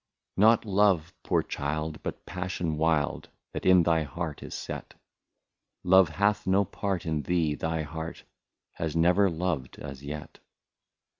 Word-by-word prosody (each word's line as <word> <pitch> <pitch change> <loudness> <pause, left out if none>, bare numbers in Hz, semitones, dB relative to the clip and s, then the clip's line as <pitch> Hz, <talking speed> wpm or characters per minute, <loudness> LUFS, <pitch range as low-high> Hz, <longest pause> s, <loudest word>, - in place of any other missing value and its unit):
Not 110 +3 +5
love, 95 -5 +2
poor - - +1
child, 75 +2 -3
but - - -6
passion 90 -3 -3
wild, 80 -1 0 0.2
That - - -3
in 90 -2 +7
thy 80 -1 +3
heart 75 +1 -5
is - - -7
set; - - -6 0.9
Love 95 -1 +6
hath 100 +6 +1
no 95 +2 +4
part 100 -2 -3
in 80 -2 -1
thee, 80 -2 +1
thy 80 +1 -2
heart 80 +2 -6 0.5
Has 80 -1 -4
never 90 +4 +4
loved 80 -6 -2
as 70 -1 -8
yet. 75 +1 -7
85 Hz, 140 wpm, -28 LUFS, 75-95 Hz, 0.9 s, in